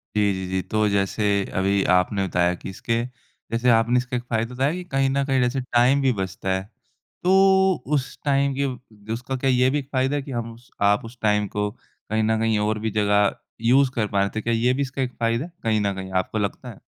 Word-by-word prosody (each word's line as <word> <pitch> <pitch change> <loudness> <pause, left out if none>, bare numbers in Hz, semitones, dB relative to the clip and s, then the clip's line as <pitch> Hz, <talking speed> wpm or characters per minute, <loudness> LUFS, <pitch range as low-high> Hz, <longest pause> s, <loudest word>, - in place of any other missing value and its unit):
जी, 100 -2 +3
जी, 95 0 -4
जी। 95 0 -1
तो 110 +2 0
जैसे 100 +1 0 0.4
अभी 100 +1 +2
आपने 95 +2 +2
बताया 90 0 +1
कि - - -8
इसके 115 +4 -2 0.5
जैसे 120 +2 +1
आपने 115 +2 +4
इसका 125 +1 -2
एक 120 - -5
फ़ायदे 115 0 -2
बताए 135 +5 +1
कि 180 - -5
कहीं 135 0 +2
न 140 +1 +1
कहीं 135 -2 +1
जैसे 125 +2 0
टाइम 125 +2 +3
भी 135 - +3
बचता 95 0 -4
है। 95 - -2 0.6
तो 190 -3 +4
उस 135 -1 -3
टाइम 140 -1 +2
के 115 -5 -5
उसका 125 +3 -4
क्या 135 +1 0
ये 125 0 +4
भी 145 +2 0
एक 135 - -9
फ़ायदा 135 +2 +1
कि 135 - -9
हम 115 -1 -4
स 120 - -22
आप 100 +2 +3
उस 120 +2 -11
टाइम 105 -1 +2
को 105 0 +1
कहीं 110 0 -4
न 110 0 +1
कहीं 110 -1 +1
और 105 +1 0
भी 110 0 -2
जगह 105 -1 +2 0.3
यूज़ 125 +3 +4
कर 110 -3 0
पाए 100 0 +2
थे। 110 - -1
क्या 115 - -1
ये 120 +3 +2
भी 140 - -2
इसका 135 -1 -2
फ़ायदा 115 +3 -1
है, 175 - -13
कहीं 110 -2 +1
न 100 -1 0
कहीं 95 0 -7
आपको 110 - -6
लगता 100 -2 -3
है? - - -11
115 Hz, 225 wpm, -23 LUFS, 105-130 Hz, 0.6 s, आपने